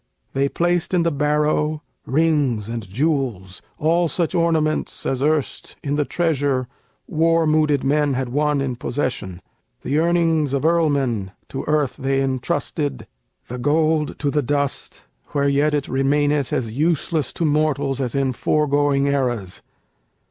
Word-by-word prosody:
They 140 Hz, +1 st, +1 dB
placed 175 Hz, +2 st, 0 dB
in 175 Hz, -, +3 dB
the 170 Hz, -, +1 dB
barrow 150 Hz, +1 st, 0 dB, 0.2 s
rings 140 Hz, -7 st, +1 dB
and 115 Hz, -4 st, -5 dB
jewels, 125 Hz, -, -1 dB, 0.2 s
All 165 Hz, +3 st, +2 dB
such 170 Hz, +1 st, -1 dB
ornaments 160 Hz, -3 st, 0 dB
as 130 Hz, -1 st, -1 dB
erst 150 Hz, -1 st, -1 dB
in 145 Hz, 0 st, -1 dB
the 150 Hz, -1 st, +1 dB
treasure 140 Hz, -7 st, 0 dB, 0.4 s
War 165 Hz, +1 st, +2 dB
mooded 155 Hz, -2 st, +2 dB
men 145 Hz, 0 st, +2 dB
had 130 Hz, -1 st, -2 dB
won 145 Hz, +2 st, +1 dB
in 130 Hz, -3 st, -2 dB
possession: 105 Hz, -10 st, -3 dB, 0.4 s
The 145 Hz, +3 st, +1 dB
earnings 165 Hz, -4 st, +2 dB
of 140 Hz, +2 st, 0 dB
earlmen 140 Hz, -, +1 dB, 0.2 s
to 135 Hz, -, -5 dB
earth 150 Hz, -3 st, +1 dB
they 135 Hz, 0 st, 0 dB
intrusted, 135 Hz, +3 st, -2 dB, 0.4 s
The 125 Hz, +1 st, -6 dB
gold 155 Hz, +2 st, +1 dB
to 145 Hz, -1 st, -1 dB
the 150 Hz, -, +1 dB
dust, 140 Hz, +1 st, -2 dB, 0.3 s
where 140 Hz, -1 st, +2 dB
yet 145 Hz, +2 st, +2 dB
it 145 Hz, -1 st, -2 dB
remaineth 145 Hz, +1 st, +1 dB
As 115 Hz, -3 st, -1 dB
useless 155 Hz, +1 st, 0 dB
to 165 Hz, -, -1 dB
mortals 145 Hz, -3 st, +1 dB
as 125 Hz, -1 st, -2 dB
in 135 Hz, -2 st, +1 dB
foregoing 145 Hz, 0 st, +1 dB
eras. 125 Hz, -9 st, -1 dB
145 Hz, 140 wpm, -21 LUFS, 135-155 Hz, 0.4 s, in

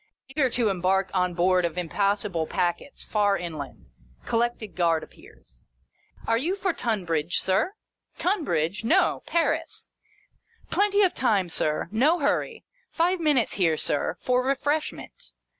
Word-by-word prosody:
eager 270 Hz, -1 st, +1 dB
to 235 Hz, -2 st, +1 dB
embark 190 Hz, 0 st, +1 dB
on 180 Hz, -2 st, 0 dB
board 180 Hz, +1 st, +3 dB
of 170 Hz, 0 st, -2 dB
im 180 Hz, -2 st, -2 dB
possible 200 Hz, -3 st, 0 dB
packets, 175 Hz, +10 st, -2 dB
far 205 Hz, -2 st, +1 dB
inland. 160 Hz, -5 st, -7 dB, 0.4 s
Collected 230 Hz, -3 st, -1 dB
Guard 165 Hz, -3 st, +2 dB
appears. -, -, -18 dB, 0.3 s
" -, -, -23 dB
Are 230 Hz, 0 st, +2 dB
you 340 Hz, +9 st, -1 dB
for 390 Hz, -3 st, -1 dB
Tunbridge, 175 Hz, -, -1 dB
Sir 195 Hz, -, +1 dB
] -, -, -61 dB
" -, -, -38 dB
"Tunbridge? 200 Hz, -, 0 dB
No. 340 Hz, +12 st, +2 dB
Paris." 335 Hz, -1 st, -1 dB, 0.4 s
" -, -, -35 dB
Plenty 410 Hz, 0 st, +3 dB
of 370 Hz, -, +3 dB
time, 200 Hz, -8 st, +1 dB
Sir. 155 Hz, -1 st, -1 dB
No 275 Hz, +11 st, +3 dB
hurry. 290 Hz, -4 st, -1 dB, 0.3 s
Five 350 Hz, +2 st, +1 dB
minutes 295 Hz, -7 st, +2 dB
here, 165 Hz, -3 st, +3 dB
Sir, 145 Hz, -, 0 dB
for 250 Hz, 0 st, +1 dB
refreshment." 290 Hz, -, -3 dB
210 Hz, 145 wpm, -26 LUFS, 175-290 Hz, 0.4 s, board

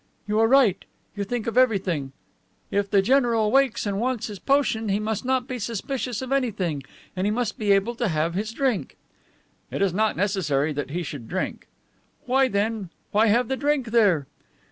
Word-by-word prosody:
"You 210 Hz, +1 st, +1 dB
are 225 Hz, -, +5 dB
right. 235 Hz, -7 st, +4 dB, 0.3 s
You 205 Hz, -, -2 dB
think 230 Hz, +2 st, -3 dB
of 235 Hz, +2 st, +2 dB
everything. 185 Hz, -, +1 dB, 0.6 s
If 200 Hz, 0 st, 0 dB
the 200 Hz, -2 st, +3 dB
general 235 Hz, -3 st, +3 dB
wakes 265 Hz, -4 st, +2 dB
and 200 Hz, -1 st, -1 dB
wants 250 Hz, -1 st, -1 dB
his 205 Hz, -3 st, -7 dB
potion, 250 Hz, -5 st, +1 dB
he 200 Hz, +1 st, +1 dB
must 215 Hz, 0 st, -2 dB
not 260 Hz, -1 st, 0 dB
be 255 Hz, -2 st, -4 dB
suspicious 235 Hz, +2 st, -3 dB
of 260 Hz, -, -7 dB
anything, 200 Hz, -, 0 dB, 0.3 s
and 185 Hz, +2 st, 0 dB
he -, -, +2 dB
must 220 Hz, 0 st, -2 dB
be 210 Hz, -2 st, +1 dB
able 200 Hz, +4 st, +3 dB
to 235 Hz, -, 0 dB
have 160 Hz, -1 st, 0 dB
his 210 Hz, +4 st, -2 dB
drink." 255 Hz, -3 st, -1 dB, 0.7 s
"It -, -, -4 dB
is 195 Hz, -3 st, +2 dB
not 215 Hz, +2 st, +1 dB
necessary 160 Hz, -7 st, 0 dB
that 140 Hz, -2 st, -4 dB
he 175 Hz, +4 st, -3 dB
should 145 Hz, -6 st, -7 dB
drink." 185 Hz, +1 st, -4 dB, 0.6 s
"Well, 260 Hz, +1 st, +3 dB
then, 205 Hz, -2 st, -1 dB, 0.2 s
why 215 Hz, +2 st, +4 dB
have 235 Hz, +3 st, +3 dB
the 265 Hz, -, -1 dB
drink 280 Hz, -4 st, 0 dB
there?" 200 Hz, -11 st, +3 dB
215 Hz, 190 wpm, -24 LUFS, 195-245 Hz, 0.7 s, are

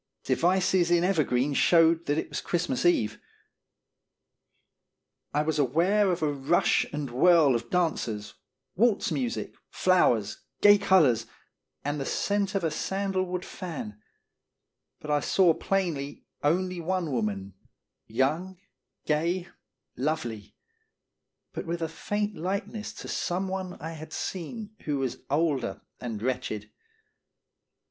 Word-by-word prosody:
Devices 185 Hz, 0 st, +2 dB
in 175 Hz, 0 st, +4 dB
ever 180 Hz, -4 st, +3 dB
green 130 Hz, +2 st, 0 dB
showed 165 Hz, +2 st, +4 dB
that 145 Hz, -, +1 dB
it -, -, -1 dB
was -, -, -4 dB
Christmae 175 Hz, -2 st, +1 dB
Eve. 110 Hz, -10 st, 0 dB, 2.1 s
I 150 Hz, +1 st, +1 dB
was 155 Hz, 0 st, -1 dB
aware 175 Hz, -, +3 dB
of 175 Hz, -3 st, -1 dB
a 150 Hz, -1 st, +1 dB
rush 140 Hz, +5 st, +2 dB
and 145 Hz, -3 st, -4 dB
whirl 155 Hz, +1 st, +5 dB
of 120 Hz, 0 st, -2 dB
dancers, 120 Hz, -12 st, -1 dB, 0.4 s
walz 225 Hz, +1 st, +2 dB
music, 250 Hz, -3 st, -2 dB, 0.2 s
flowers, 150 Hz, -, +2 dB, 0.2 s
gay 205 Hz, 0 st, +7 dB
colors, 160 Hz, -, +4 dB, 0.6 s
and 145 Hz, +1 st, -1 dB
the 135 Hz, -, -3 dB
scent 200 Hz, -1 st, 0 dB
of 195 Hz, -, 0 dB
a 160 Hz, -, +1 dB
sandal 195 Hz, +1 st, -1 dB
wood 180 Hz, 0 st, -4 dB
fan; 140 Hz, -, -7 dB, 1.0 s
but 150 Hz, -, -5 dB
I 145 Hz, -, +3 dB
saw 175 Hz, +3 st, +4 dB
plainly 160 Hz, -7 st, -2 dB, 0.2 s
only 180 Hz, +4 st, +1 dB
one 175 Hz, -2 st, -1 dB
woman, 100 Hz, -5 st, -2 dB, 0.5 s
young, 155 Hz, +11 st, 0 dB, 0.5 s
gay, 170 Hz, +4 st, 0 dB, 0.5 s
lovely, 120 Hz, -7 st, -3 dB, 1.0 s
but -, -, -5 dB
with 170 Hz, 0 st, -2 dB
a -, -, 0 dB
faint 205 Hz, +5 st, -3 dB
likeness 200 Hz, +5 st, -3 dB
to -, -, -9 dB
some 185 Hz, +2 st, -1 dB
one 185 Hz, -1 st, -4 dB
I 160 Hz, -, -5 dB
had 155 Hz, 0 st, -9 dB
seen 205 Hz, +4 st, -5 dB
who 145 Hz, -2 st, 0 dB
was 135 Hz, -2 st, -2 dB
older 140 Hz, -8 st, 0 dB, 0.2 s
and 115 Hz, -3 st, -5 dB
wretched. 120 Hz, -5 st, -3 dB
165 Hz, 125 wpm, -28 LUFS, 135-185 Hz, 2.1 s, gay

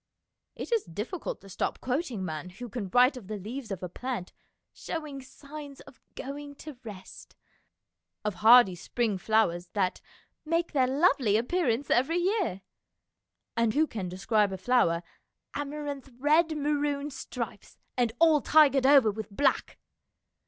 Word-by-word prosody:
It -, -, -7 dB
is 460 Hz, -3 st, +2 dB
difficult 220 Hz, -, -5 dB
to 195 Hz, -, -14 dB
stop 190 Hz, -, -2 dB
quoting 255 Hz, -, -2 dB
a -, -, -2 dB
man 160 Hz, 0 st, -5 dB
who 235 Hz, +7 st, -9 dB
can 215 Hz, -4 st, -5 dB
write 250 Hz, +6 st, +5 dB
of 220 Hz, -7 st, -10 dB
the 215 Hz, 0 st, -4 dB
leaves 225 Hz, +5 st, -7 dB
of 190 Hz, -2 st, -5 dB
a -, -, -2 dB
plant 240 Hz, 0 st, -5 dB, 0.2 s
" -, -, -55 dB
showing 300 Hz, -4 st, -5 dB
signs 285 Hz, +1 st, -10 dB
of -, -, -17 dB
going 285 Hz, +1 st, -7 dB
to 290 Hz, -3 st, -10 dB
rest," 200 Hz, -5 st, -11 dB, 0.9 s
of 210 Hz, -, 0 dB
hardy 225 Hz, -3 st, +8 dB
spring 210 Hz, +3 st, -2 dB
flowers 180 Hz, -4 st, +1 dB
that 190 Hz, -3 st, 0 dB, 0.2 s
" -, -, -47 dB
make 335 Hz, 0 st, +1 dB
their 265 Hz, -4 st, +3 dB
lovely 265 Hz, -, +3 dB
appearance 255 Hz, -1 st, 0 dB
every 270 Hz, +8 st, +3 dB
year," 360 Hz, -, 0 dB, 0.9 s
and 230 Hz, -2 st, +1 dB
who 310 Hz, +2 st, +4 dB
can 200 Hz, -, -5 dB
describe 200 Hz, +3 st, +1 dB
a 190 Hz, -, -4 dB
flower 185 Hz, -5 st, +2 dB, 0.3 s
" -, -, -57 dB
amaranth 285 Hz, -1 st, -5 dB
red 310 Hz, +4 st, +3 dB
maroon 290 Hz, 0 st, -1 dB
stripes, 235 Hz, -6 st, -7 dB, 0.2 s
and 245 Hz, -3 st, +1 dB
all 315 Hz, -1 st, +5 dB
tigered 280 Hz, -4 st, +5 dB
over 270 Hz, -6 st, +6 dB
with 220 Hz, +1 st, -7 dB
black." 270 Hz, +7 st, 0 dB
250 Hz, 155 wpm, -28 LUFS, 210-290 Hz, 0.9 s, hardy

